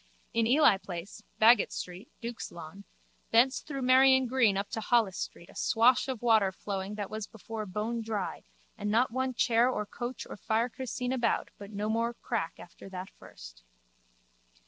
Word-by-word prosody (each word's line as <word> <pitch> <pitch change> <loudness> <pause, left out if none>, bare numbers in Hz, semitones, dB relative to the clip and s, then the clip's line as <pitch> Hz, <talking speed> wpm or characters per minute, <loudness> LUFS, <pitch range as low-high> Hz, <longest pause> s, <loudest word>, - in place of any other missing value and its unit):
In 230 -1 +2
Ely 250 -5 +5
place, 190 +2 -8 0.2
Baggot 225 0 +6
street, 180 +6 -7
Duke's 235 0 -6
lawn, 170 +4 -10 0.4
thence 245 +4 +4
through 275 -3 -6
Merrion 260 +1 +6
green 235 -5 +3
up 200 +1 -2
to 220 - -3
Holles 220 -4 +2
street 170 - -6
a - - -16
swash 245 +4 +3
of 255 -3 -4
water 220 -5 +4
flowing 195 +1 -5
that 205 -2 -5
was 215 -1 -4
before 220 0 -7
bonedry 215 0 -3 0.4
and 205 - -2
not 230 +3 +2
one 260 +1 -1
chair 235 +1 +3
or 210 -4 -2
coach 240 +4 -6
or - - -8
fiacre 230 +5 -1
seen 250 +1 -2
about 240 -3 0
but 200 -1 -9
no 210 0 -3
more 230 +2 0
crack 220 -10 -3
after 175 +2 -12
that 185 0 -7
first. - - -13
225 Hz, 170 wpm, -30 LUFS, 200-245 Hz, 0.4 s, Baggot